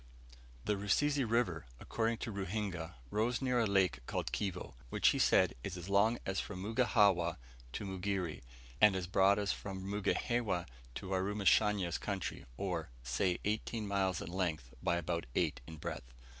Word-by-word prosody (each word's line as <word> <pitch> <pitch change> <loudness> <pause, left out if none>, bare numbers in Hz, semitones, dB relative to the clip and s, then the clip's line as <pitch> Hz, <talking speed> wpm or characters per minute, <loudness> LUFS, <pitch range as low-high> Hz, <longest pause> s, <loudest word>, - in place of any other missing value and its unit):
The 105 - +1
Rusizi 140 +8 +2
River 110 - 0
according 115 0 -1
to 115 - -4
Ruhinga 95 -5 -3 0.2
rose 115 +3 +1
near 125 -2 +1
a 115 - +3
lake 95 -10 +2
called - - -2
Kivo, 95 -3 -3 0.2
which - - +4
he - - +1
said - - +4
is 90 -2 -4
as 90 +2 -7
long 105 +4 +4
as 95 0 -1
from 100 -3 -5
Mugihawa 100 -7 +3 0.4
to - - -4
Mugere, 95 -3 -2 0.4
and 105 -2 +7
as 95 -2 -1
broad 95 +2 +4
as 100 -2 +1
from 95 -2 -6
Mugihewa 105 -1 0 0.3
to 95 - -6
Warumashanya's 100 -1 +2
country, 100 -4 -4
or, 90 -7 -2
say 75 +10 +1
eighteen 110 +1 -1
miles 95 -2 0
in - - -7
length 80 -9 -2
by - - +2
about 85 -3 -2
eight - - +1
in 80 - -8
breadth. - - -6
100 Hz, 155 wpm, -35 LUFS, 90-105 Hz, 0.4 s, and